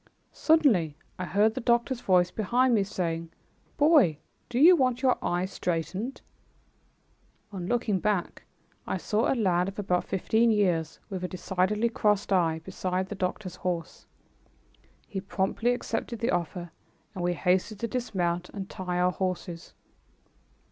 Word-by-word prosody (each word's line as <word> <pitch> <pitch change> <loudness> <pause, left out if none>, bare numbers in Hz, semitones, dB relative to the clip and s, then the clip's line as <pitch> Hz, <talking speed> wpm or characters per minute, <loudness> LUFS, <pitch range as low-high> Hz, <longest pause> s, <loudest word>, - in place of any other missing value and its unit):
Suddenly 225 - +3 0.2
I 180 - -2
heard 210 +4 +2
the 260 - -4
doctor's 240 +1 +1
voice 180 -2 +3
behind 240 +4 +2
me 210 -3 +3
saying, 170 -4 -3 0.5
"Boy, 290 - +5 0.3
do 245 - -3
you 335 +7 +8
want 255 -3 +1
your 255 -1 +4
eye 175 +1 0
straightened?" 190 +7 -3 1.3
On 185 -3 -5
looking 220 -4 0
back 200 -2 -1 0.5
I - - -1
saw 215 +1 0
a - - +2
lad 180 -4 +2
of 195 - -6
about 180 -3 0
fifteen 220 +5 +1
years, 175 -7 +1
with 185 -2 -4
a - - -1
decidedly 190 +5 0
crossed 210 -3 +1
eye, 165 -3 +2
beside 185 +1 -3
the - - -4
doctor's 185 0 -4
horse. 175 -2 -4 1.0
He 195 - -5
promptly 200 +4 0
accepted 235 -1 -3
the 230 +2 0
offer, 175 0 -3 0.4
and 185 -3 -5
we 175 0 +1
hastened 185 +6 0
to 230 - 0
dismount 180 -8 -2
and 195 -2 -7
tie 180 -1 -3
our 180 0 +3
horses. 180 -2 -4
190 Hz, 145 wpm, -28 LUFS, 180-230 Hz, 1.3 s, you